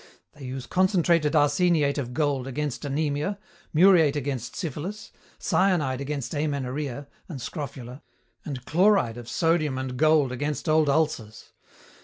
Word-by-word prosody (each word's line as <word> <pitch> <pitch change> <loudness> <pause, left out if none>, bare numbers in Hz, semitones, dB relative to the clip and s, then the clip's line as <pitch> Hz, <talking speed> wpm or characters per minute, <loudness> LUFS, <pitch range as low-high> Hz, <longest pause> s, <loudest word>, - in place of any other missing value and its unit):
They 145 -3 -12
use 130 0 -5
concentrated 170 - +2
arseniate 150 -1 +3
of 125 -3 -4
gold 140 -1 -1
against 145 0 -3
anemia, 145 +6 -1 0.3
muriate 165 -3 +5
against 135 -4 -3
syphilis, 180 +5 -5 0.3
cyanide 155 -9 +1
against 140 -2 -4
amenorrhea 140 -2 -3 0.2
and 150 -6 -6
scrofula, 130 -2 -7 0.4
and 130 -4 -6
chloride 180 - +3
of 120 -1 -9
sodium 160 -5 +1
and 130 -1 -4
gold 155 -2 +3
against 145 +2 -3
old 155 -1 +3
ulcers. 130 -8 -1
145 Hz, 125 wpm, -26 LUFS, 130-160 Hz, 0.4 s, muriate